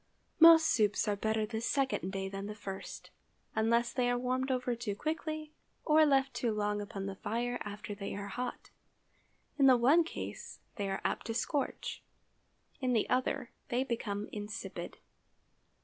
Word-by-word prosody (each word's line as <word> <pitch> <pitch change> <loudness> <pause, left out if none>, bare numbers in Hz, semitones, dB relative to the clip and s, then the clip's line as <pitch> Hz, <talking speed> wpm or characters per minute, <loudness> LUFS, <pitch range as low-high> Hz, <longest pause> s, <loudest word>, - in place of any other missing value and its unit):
Most 330 -1 +9
soups 210 -8 +2
are 205 - +2
better 220 +1 0
the 220 +1 -4
second 265 -7 0
day 195 0 -3
than 195 +1 -5
the 210 - -6
first, 195 -2 -7 0.4
unless 235 +2 +2
they 245 -1 +1
are 245 - +2
warmed 255 +2 -1
over 250 -1 0
too 225 -3 -3
quickly 310 +3 -3 0.3
or 310 0 +6
left 270 -1 +3
too 235 - 0
long 210 -1 -1
upon 200 -1 -5
the 195 - -3
fire 245 +4 -2
after 205 -1 -6
they 200 -1 -5
are 200 0 -5
hot. 250 +2 -5 0.9
In 275 - +7
the 255 -2 +7
one 280 +8 +5
case 325 - -7 0.2
they 200 -2 -2
are 195 - -2
apt - - -1
to 225 - -3
scorch; 275 +4 -2 0.8
in 255 -2 +1
the 220 - +2
other 255 0 0 0.2
they 245 +2 +1
become 215 -5 -3
insipid. 205 0 -6
235 Hz, 165 wpm, -32 LUFS, 205-260 Hz, 0.9 s, Most